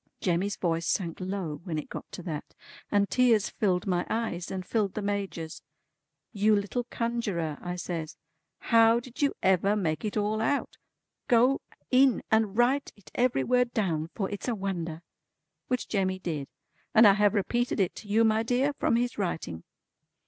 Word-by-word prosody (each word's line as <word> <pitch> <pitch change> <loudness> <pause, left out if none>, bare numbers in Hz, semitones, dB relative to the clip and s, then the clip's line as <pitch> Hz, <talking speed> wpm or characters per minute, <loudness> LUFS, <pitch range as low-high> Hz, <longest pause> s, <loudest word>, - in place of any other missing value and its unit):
Jemmy's 185 +3 0
voice 165 -2 -1
sank 170 -3 -1
low 185 -6 -4
when 170 -4 -3
it 155 - -4
got - - -8
to 180 - -7
that, 155 -4 -6 0.3
and 205 -1 +2
tears 235 -4 +3
filled 185 -4 0
my 180 -2 +1
eyes, 220 -6 -2
and 185 -1 -4
filled 205 -3 0
the 215 - -2
Major's. 195 -5 -3 0.7
"You 210 0 +3
little 205 +4 -1
Conjurer" 215 -11 -2
I 180 0 -4
says, 170 -2 -5 0.4
"how 230 0 +4
did 245 +2 -10
you 285 - +2
ever 190 +2 +3
make 160 -7 -1
it 215 0 -2
all 210 +1 0
out? 280 +5 -1 0.5
Go 250 +2 +4 0.3
in 260 -1 +4
and 220 -2 +2
write 260 +4 +2
it 180 -7 -18
every 240 - +2
word 250 -1 +1
down, 165 -7 0
for 195 -4 -1
it's 205 - -5
a 240 - 0
wonder." 175 -5 -4 0.6
Which 250 -1 -1
Jemmy 190 -3 0
did, 160 -7 -4 0.5
and 225 +1 +8
I 200 - +8
have 210 +1 +3
repeated 240 +5 0
it 190 -3 +1
to 215 - -10
you 215 +3 +3
my 220 0 +3
dear 255 +5 +1
from 255 - +1
his 240 -1 -1
writing. 160 - -3
205 Hz, 170 wpm, -28 LUFS, 175-230 Hz, 0.7 s, and